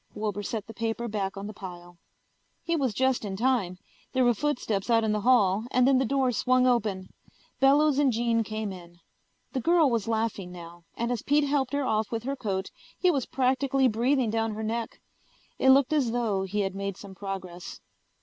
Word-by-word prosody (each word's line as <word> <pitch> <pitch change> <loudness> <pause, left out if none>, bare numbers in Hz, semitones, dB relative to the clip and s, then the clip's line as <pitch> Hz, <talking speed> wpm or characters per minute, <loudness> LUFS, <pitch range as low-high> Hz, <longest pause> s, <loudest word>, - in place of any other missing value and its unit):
Wilbur 210 -1 -3
set 210 0 -4
the 225 - -10
paper 230 +1 -3
back 200 -3 -3
on 195 - -5
the 210 - -6
pile. 175 -3 -10 0.6
He 335 0 0
was 270 -6 0
just 260 +3 +1
in 195 -2 -4
time. 225 -7 0 0.4
There 260 -1 +3
were 240 - +4
footsteps 235 -6 -2
out 230 -1 +4
in 220 - +1
the 210 0 0
hall 215 -3 +3
and 255 -1 +3
then 270 -1 +4
the 265 - +1
door 265 -1 +1
swung 255 +2 +2
open. 215 -7 +1 0.5
Bellows 285 +2 +4
and 280 -3 +4
Jean 230 0 +1
came 215 -1 -4
in. 175 -1 -13 0.6
The 265 - -1
girl 330 -2 +4
was 230 -3 -1
laughing 220 -5 -2
now, 170 -1 -11
and 235 +1 -1
as 240 -3 -2
Pete 290 +1 +2
helped 280 -2 0
her 285 -1 0
off 215 -2 0
with 230 -1 -3
her 275 +2 -2
coat 195 -7 -3 0.3
he 365 - +3
was 275 -6 -1
practically 265 +1 +1
breathing 245 +1 +1
down 225 -1 -1
her 220 - -4
neck. 225 +1 -3 0.6
It 265 - +4
looked 270 +2 +5
as 270 -7 +2
though 220 -5 0
he 205 +2 -1
had 195 -1 -2
made 200 -1 -4
some 200 -2 -11
progress. 190 -3 -7
230 Hz, 200 wpm, -27 LUFS, 200-260 Hz, 0.6 s, looked